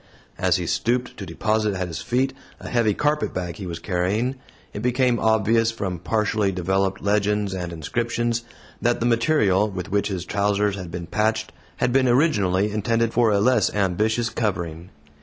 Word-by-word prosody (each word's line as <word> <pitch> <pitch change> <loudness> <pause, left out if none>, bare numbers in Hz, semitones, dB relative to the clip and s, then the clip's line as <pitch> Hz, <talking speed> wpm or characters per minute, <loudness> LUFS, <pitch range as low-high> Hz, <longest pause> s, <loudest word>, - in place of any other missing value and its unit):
As - - +3
he - - -1
stooped 120 +2 -1
to 100 - -7
deposit 105 +5 0
at 90 -1 -2
his 85 -1 -5
feet 130 +4 0 0.3
a - - -9
heavy 115 -4 +1
carpetbag 95 - -1
he 95 - -6
was 85 -1 -4
carrying, 95 +8 -1 0.4
it 105 - -5
became 125 0 +2
obvious, 110 +1 +3
from 95 -6 -4
partially 105 +1 0
developed 95 +1 -1
legends 105 -1 +1
and 90 -2 -4
inscriptions, 120 +8 -1 0.4
that 120 0 +1
the 115 - -1
material 115 -4 +3
with 90 -2 -6
which 100 0 +1
his 95 -4 -4
trousers 100 0 +1
had 90 -3 -7
been 85 0 -5
patched 105 +5 0 0.3
had 125 -1 +1
been 130 -1 +4
originally 105 - +2
intended 115 +2 0
for 120 -1 +4
a 100 -1 +3
less 125 +5 +3
ambitious 110 +4 +1
covering. 85 -6 -3
105 Hz, 165 wpm, -23 LUFS, 95-115 Hz, 0.4 s, been